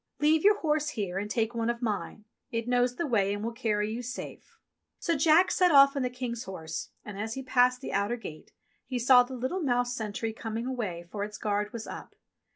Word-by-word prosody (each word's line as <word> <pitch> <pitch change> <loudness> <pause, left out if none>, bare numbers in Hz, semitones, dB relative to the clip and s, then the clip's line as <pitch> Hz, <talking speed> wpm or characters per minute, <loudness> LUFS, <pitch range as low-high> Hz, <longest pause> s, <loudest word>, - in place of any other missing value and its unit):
Leave 310 +1 +3
your 415 +1 +6
horse 300 -1 +1
here 195 -8 -3
and 205 +1 -4
take 225 +1 0
one 230 0 -1
of 235 0 -1
mine. 215 -2 -3 0.2
It 230 0 -3
knows 245 0 +2
the 340 - -2
way 205 -7 +1
and 205 - -5
will 230 - -2
carry 215 -2 -1
you 240 - -4
safe." 245 +1 -8 0.4
So 335 - 0
Jack 315 +5 +5
set 360 -1 +4
oflf 275 -1 +7
on 280 - 0
the 250 - 0
King's 245 -2 -5
horse, 160 -4 -6 0.2
and 205 -2 -7
as 220 +1 -3
he 265 - -5
passed 250 0 +3
the - - -5
outer 200 +4 +1
gate 155 -9 -10 0.4
he 255 0 -2
saw 250 +1 +7
the 250 +1 -4
little 260 +10 -2
mouse 245 -4 +1
sentry 220 0 -3
coming 225 +1 -4
away, 210 -10 -3
for 205 -1 -3
its 210 0 -6
guard 210 -1 -1
was 230 -2 -6
up. - - -9
235 Hz, 220 wpm, -29 LUFS, 210-260 Hz, 0.4 s, oflf